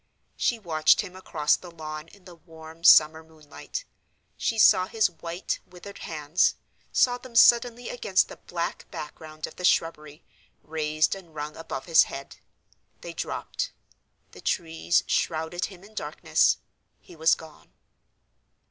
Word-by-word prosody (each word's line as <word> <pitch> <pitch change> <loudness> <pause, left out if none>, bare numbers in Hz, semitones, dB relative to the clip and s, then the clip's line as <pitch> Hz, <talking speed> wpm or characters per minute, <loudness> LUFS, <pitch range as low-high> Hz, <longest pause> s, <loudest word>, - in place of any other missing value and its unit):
She 235 - +1
watched 160 -7 +3
him 180 - -9
across 155 -5 +1
the 180 - -11
lawn 155 -1 -7
in 185 +2 -20
the 180 - -12
warm 160 -1 -14
summer 160 -1 +7
moonlight. 160 - -9 0.5
She 225 - -1
saw 185 -3 +6
his 220 -3 +1
white, 170 +2 -4
withered 185 +3 -12
hands, 155 +2 +1 0.4
saw 245 -1 +3
them 250 -2 -13
suddenly 240 0 +5
against 195 -6 +1
the - - -11
black 170 -1 -5
background 155 +1 -7
of - - -12
the 180 - -8
shrubbery, 155 -3 0 0.4
raised 155 0 0
and 175 -5 -11
wrung 150 0 -5
above 160 -5 -6
his 165 -2 +6
head. 135 0 -9 0.6
They - - -7
dropped—the - - -7
trees 80 +1 0
shrouded 160 +2 -1
him 190 -2 -12
in 210 +2 -16
darkness—he 175 - -1
was 160 0 +4
gone. 160 -1 -15
165 Hz, 135 wpm, -26 LUFS, 155-185 Hz, 0.6 s, summer